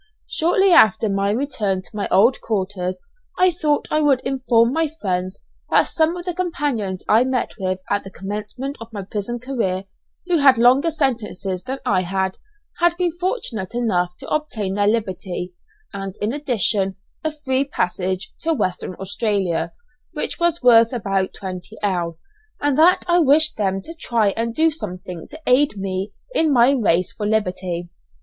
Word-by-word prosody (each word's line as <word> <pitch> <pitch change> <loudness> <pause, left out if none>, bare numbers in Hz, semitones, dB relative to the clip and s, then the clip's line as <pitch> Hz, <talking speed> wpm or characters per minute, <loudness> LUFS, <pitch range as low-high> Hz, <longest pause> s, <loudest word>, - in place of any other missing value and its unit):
Shortly 365 +4 +2
after 220 - +6
my 195 0 0
return 210 -6 -1
to - - -13
my 205 - -2
old 220 +8 +4
quarters, 190 -3 -3 0.3
I 370 0 +5
thought 305 -3 0
I 305 - +2
would 280 -4 +4
inform 245 -3 +2
my 320 0 +1
friends 185 0 -2 0.3
that - - +5
some 325 +2 +1
of 350 - -7
the 360 - -2
companions 290 - -2
I 225 +3 +5
met 255 -1 -1
with 185 -1 -2
at 205 0 0
the 195 - -9
commencement 210 +9 -5
of 230 0 -9
my 205 -3 -5
prison 210 +4 -4
career, 230 -7 -2 0.4
who 355 -2 +2
had 270 -3 +6
longer 255 +7 +5
sentences 225 - -2
than 265 +5 -4
I 185 - +2
had, 190 +1 -2 0.4
had 345 0 +3
been 355 -2 +1
fortunate 335 - -3
enough 180 -7 0
to - - -10
obtain 225 -11 -2
their 205 0 +1
liberty, 190 -4 -2 0.4
and, 195 -1 -5
in 210 +3 -1
addition, 215 - +1 0.3
a 315 - 0
free 275 -3 -1
passage 185 -6 -2
to 325 0 0
Western 185 -5 -2
Australia 190 -4 -1 0.4
which - - -3
was 340 -3 +1
worth 230 -2 +6
about 195 -5 -1
20_l._ 185 -2 -3 0.4
and 290 -2 +1
that 330 +5 +5
I 350 0 +4
wished 310 0 +4
them 195 -2 -1
to 330 - -7
try 225 -4 +2
and 230 +3 -2
do 320 +1 +4
something 180 - -7
to 310 - -10
aid 255 -3 +3
me 190 +1 -3 0.2
in 320 -10 +2
my 245 0 +5
race 185 -9 +2
for 210 - -3
liberty. 180 -5 -2
220 Hz, 165 wpm, -21 LUFS, 190-285 Hz, 0.4 s, after